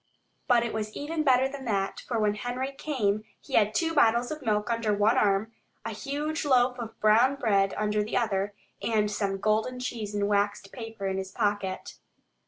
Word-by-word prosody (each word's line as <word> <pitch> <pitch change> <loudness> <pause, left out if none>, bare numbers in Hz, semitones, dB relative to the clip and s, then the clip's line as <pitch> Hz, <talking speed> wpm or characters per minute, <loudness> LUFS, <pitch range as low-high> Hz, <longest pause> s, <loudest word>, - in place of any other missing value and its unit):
But 240 -1 +4
it 235 - -3
was 215 -1 -4
even 310 +2 -2
better 265 -3 +4
than 270 0 -8
that, 195 -4 -1
for 235 - -1
when 210 -1 +2
Henry 250 +5 -3
came 220 -8 -1 0.2
he - - -13
had 215 0 +3
two 330 +5 +1
bottles 240 -4 +3
of 310 0 -5
milk 210 -1 0
under 230 -2 0
one 210 +4 +3
arm, 210 -2 +2 0.3
a 225 - -3
huge 290 +8 -3
loaf 250 -3 +3
of 225 -1 -7
brown 230 +6 +4
bread 200 -7 +1
under 210 0 +1
the 215 - -2
other, 205 -3 0 0.3
and 210 -2 +1
some 200 -1 -1
golden 220 +5 0
cheese 220 -4 -4
in 205 0 +1
waxed 205 -1 0
paper 225 -5 -7
in 190 0 -1
his 190 0 -5
pocket. 200 -2 -2
220 Hz, 190 wpm, -28 LUFS, 205-250 Hz, 0.3 s, But